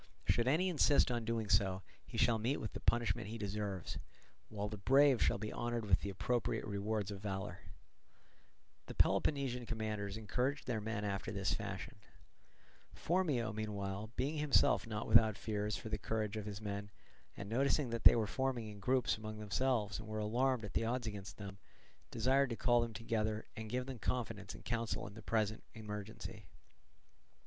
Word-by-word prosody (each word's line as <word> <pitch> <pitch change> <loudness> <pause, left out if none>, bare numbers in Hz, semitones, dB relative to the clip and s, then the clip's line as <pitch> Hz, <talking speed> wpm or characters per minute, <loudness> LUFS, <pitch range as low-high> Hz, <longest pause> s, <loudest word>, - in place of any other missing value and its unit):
Should 120 +1 +3
any 160 +8 +3
insist 150 -6 +4
on 120 -2 -1
doing 115 -1 -1
so, 95 -1 +2 0.2
he - - -6
shall 115 -1 +4
meet 125 +6 +1
with 110 - -5
the - - -5
punishment 115 -5 +1
he 115 +2 -5
deserves, 100 -3 -3 0.5
while 105 -1 -3
the 105 -1 -6
brave 135 +3 +5
shall - - +3
be 110 - -4
honoured 120 -2 -2
with 95 -3 +4
the 100 - -3
appropriate 110 +3 -1
rewards 105 0 -2
of 100 -1 -6
valour." 95 -3 -4 1.3
The - - -7
Peloponnesian 130 -5 +2
commanders 110 -3 -3
encouraged 125 +6 -1
their 115 -4 -1
men 105 -1 -2
after 100 -1 -2
this 100 -2 0
fashion. - - -5 1.0
Phormio, 150 -11 +1
meanwhile, 105 -1 -3
being 140 +5 -1
himself 150 -4 +4
not 105 -1 -3
without 110 -2 +6
fears 105 -1 -2
for 110 - -7
the 110 -1 -2
courage 110 0 -2
of 105 -1 -4
his 105 -1 -5
men, 100 -1 -4 0.5
and 100 - -6
noticing 135 +3 +2
that 115 -1 -3
they - - +10
were 115 -2 +2
forming 125 -1 -1
in 105 -1 -9
groups 125 +2 +2
among 110 0 -6
themselves 105 0 0
and 110 - -8
were 110 0 -4
alarmed 120 +3 +1
at 105 - -8
the - - +1
odds 120 +2 -1
against 100 -3 -6
them, 100 -1 -8 0.5
desired 130 +4 +3
to 115 - -2
call 120 +1 +3
them 115 -2 -3
together 110 -1 -1
and 110 -1 -6
give 125 +2 -1
them 130 -2 -6
confidence 110 -3 -3
and - - -13
counsel 115 -2 -1
in 100 - -8
the 110 - -10
present 110 -1 0
emergency. 105 -1 -7
110 Hz, 175 wpm, -36 LUFS, 105-120 Hz, 1.3 s, they